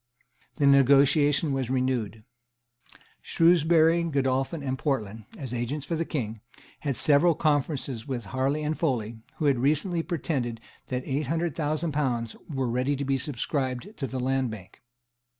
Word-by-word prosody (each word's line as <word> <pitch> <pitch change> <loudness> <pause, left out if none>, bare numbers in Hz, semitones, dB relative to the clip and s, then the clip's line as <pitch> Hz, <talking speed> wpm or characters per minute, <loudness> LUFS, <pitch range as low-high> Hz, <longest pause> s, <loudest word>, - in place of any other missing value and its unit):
The 145 - +1
negotiation 140 +2 +4
was 130 -3 -2
renewed. 125 -5 -1 1.0
Shrewsbury, 165 0 +4
Godolphin 135 0 -1
and 130 -1 -1
Portland, 110 -7 -3
as 130 -4 -6
agents 130 +5 -3
for 170 - -2
the 165 +1 -1
King, 110 -9 -4 0.4
had 140 -4 -2
several 155 +2 +5
conferences 145 -5 0
with 125 -5 -4
Harley 135 +4 0
and 150 +1 -1
Foley, 120 -9 -2 0.2
who 155 - -3
had 140 -4 +3
recently 155 +6 +1
pretended 140 -9 -3 0.3
that 125 0 -3
eight 140 +1 -2
hundred 165 +1 -1
thousand 155 +1 -1
pounds 125 -6 -1
were 135 -4 -2
ready 125 +4 0
to 140 +1 -3
be 135 0 0
subscribed 130 - -3
to 135 - -3
the 130 - -4
Land 130 0 0
Bank. 100 -4 -11
135 Hz, 150 wpm, -27 LUFS, 125-155 Hz, 1.0 s, several